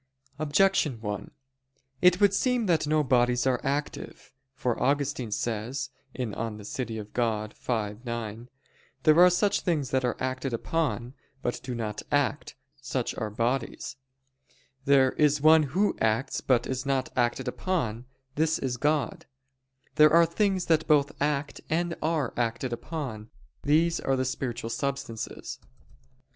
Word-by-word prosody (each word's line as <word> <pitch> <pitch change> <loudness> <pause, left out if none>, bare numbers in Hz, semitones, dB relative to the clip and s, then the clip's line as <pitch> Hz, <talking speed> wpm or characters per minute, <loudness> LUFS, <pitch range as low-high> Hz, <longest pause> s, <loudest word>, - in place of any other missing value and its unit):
Objection 155 - +2
1: 105 -2 -4 0.7
It 180 0 +5
would 200 -1 +5
seem 250 +2 +1
that 165 -5 +2
no 155 0 +3
bodies 125 -2 +2
are 130 -2 +1
active. 145 +2 -4 0.2
For 125 -3 -1
Augustine 140 -3 0
says 120 +5 -3 0.2
(De 130 - -2 0.4
Civ. 125 +4 -4
Dei 115 - -6
v, 110 -1 -2
9): 115 -1 -5 0.5
"There 155 +1 +6
are 180 +1 +9
things 175 - +1
that 130 -1 +1
are 125 - 0
acted 130 0 -2
upon, 125 -1 -1 0.3
but 120 - -1
do 130 -1 -5
not 110 -3 -4
act; 145 0 0 0.2
such 130 -2 -3
are 110 -2 -2
bodies: 120 +4 -2 0.9
there 135 -2 +5
is 150 -1 +3
one 155 +2 +7
Who 195 +8 +1
acts 110 +5 +1
but 120 -2 +2
is 130 -1 -3
not 135 -2 -1
acted 125 +1 0
upon; 125 - -2 0.3
this 160 +2 +1
is 125 -2 -2
God: 150 +2 0 0.7
there 155 0 +7
are 170 +1 +7
things 190 +1 0
that 160 -1 +2
both 145 -2 +4
act 145 0 -1
and 170 +2 0
are 155 -5 0
acted 120 +1 -1
upon; 120 -5 -5 0.3
these 165 +3 +2
are 135 - 0
the 130 0 0
spiritual 125 -3 -3
substances." 115 -2 -4
135 Hz, 135 wpm, -27 LUFS, 120-155 Hz, 0.9 s, are